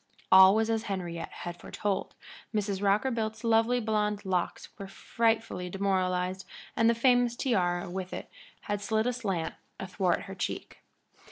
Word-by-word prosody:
All 190 +1 +9
was 220 0 +2
as 225 0 -1
Henriette 175 -5 -4
had 175 0 -7
foretold, 200 +2 -3 0.4
Mrs. 200 -2 -1
Rockerbilt's 220 +2 0
lovely 230 +2 +3
blond 210 -2 -1
locks 180 -2 -2
were 195 - -6
frightfully 225 -3 -1
demoralized, 185 -1 0 0.3
and 225 -1 +4
the 235 - +3
famous 245 0 +3
tiara 180 -9 0
with 185 +1 -5
it - - -6 0.3
had 205 -1 -3
slid 220 +1 0
aslant 205 -9 -2 0.3
athwart 185 -1 0
her 195 - -8
cheek. 180 - -5
200 Hz, 140 wpm, -29 LUFS, 185-225 Hz, 0.4 s, All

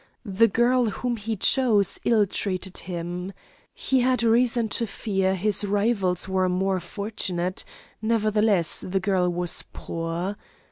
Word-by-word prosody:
The 205 +2 +3
girl 240 +4 +2
whom 240 +3 -2
he 225 0 -4
chose 215 -1 +3
ill 220 -3 +4
treated 190 -1 -4
him; 175 +2 -5 0.4
he 265 - 0
had 250 -1 +2
reason 235 0 +3
to 230 +2 -2
fear 195 -3 -1
his 205 +2 +1
rivals 200 -3 0
were 190 -1 +1
more 190 +1 0
fortunate; 185 -2 -3 0.4
nevertheless 215 -5 +2
the 190 +1 -2
girl 190 -2 +1
was 175 0 0
poor. 170 +4 -4
200 Hz, 130 wpm, -25 LUFS, 185-225 Hz, 0.4 s, ill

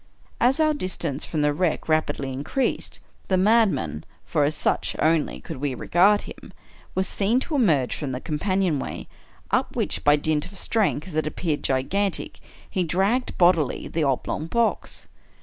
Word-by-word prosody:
As 255 +5 +3
our 310 -1 +4
distance 170 - -3
from 155 -3 -1
the 150 0 +2
wreck 165 +1 -1
rapidly 145 -4 0
increased, 145 - -2 0.3
the 190 - +2
madman 190 - +2 0.2
(for 150 -3 +1
as 150 +2 0
such 150 - 0
only 160 -1 +1
could 160 - -8
we 135 -1 -2
regard 195 +9 +3
him) - - -11 0.4
was 190 0 0
seen 210 +7 +1
to 320 - -5
emerge 155 - +2
from 145 -4 -4
the 125 - -3
companion 175 +1 0
way, - - -6 0.4
up - - 0
which - - -1
by 145 0 +6
dint 150 0 0
of 195 +1 -9
strength 190 -5 0
that 155 -1 -1
appeared 155 -1 -2
gigantic, 185 +10 -1 0.3
he 185 - -1
dragged, 195 +9 0
bodily, 170 -6 +3
the 160 - -1
oblong 140 +3 -1
box. 235 +6 -1
165 Hz, 160 wpm, -24 LUFS, 145-195 Hz, 0.4 s, by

